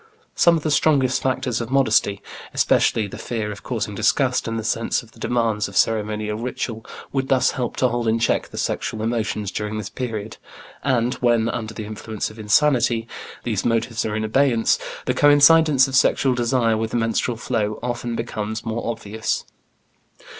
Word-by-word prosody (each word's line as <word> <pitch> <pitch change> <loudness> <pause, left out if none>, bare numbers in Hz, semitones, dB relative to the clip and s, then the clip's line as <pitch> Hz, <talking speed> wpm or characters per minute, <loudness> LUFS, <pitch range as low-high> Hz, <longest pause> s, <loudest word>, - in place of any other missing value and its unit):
Some 170 -1 +4
of 155 - -6
the 155 - 0
strongest 135 -4 +2
factors 125 -2 -1
of 115 - -5
modesty, 110 -6 +2 0.3
especially 110 - +2
the 100 - -9
fear 110 -3 -3
of 100 - -9
causing - - -3
disgust - - +1
and 115 0 -2
the 110 - -3
sense 115 +3 -1
of 115 - -18
the - - -19
demands 115 -3 0
of 100 -1 -6
ceremonial 105 -1 0
ritual, 115 -2 -4 0.3
would 135 -1 -1
thus 130 -1 +3
help 125 -3 -3
to 130 - +2
hold 120 -1 -2
in 110 +1 +2
check 115 - +1
the - - -11
sexual 110 -1 -2
emotions 110 -3 -2
during 105 +1 -3
this 105 -2 -5
period, 110 -4 -5 0.5
and 125 -2 +1
when, 120 -2 +3
under 110 -1 -4
the 110 - -5
influence 110 0 -5
of 110 - -14
insanity, 120 0 +2 0.4
these 110 -5 -1
motives 115 0 0
are 105 -1 -2
in 110 - -1
abeyance, 115 +1 +2 0.3
the - - +1
coincidence 145 -1 +6
of 135 - -3
sexual 130 0 +3
desire 120 -2 +1
with 110 0 -2
the - - -1
menstrual 115 +1 0
flow 110 -3 -2
often 120 -1 -3
becomes 110 -1 -4
more 115 +1 -3
obvious. 110 -1 -3
115 Hz, 175 wpm, -22 LUFS, 110-125 Hz, 0.5 s, coincidence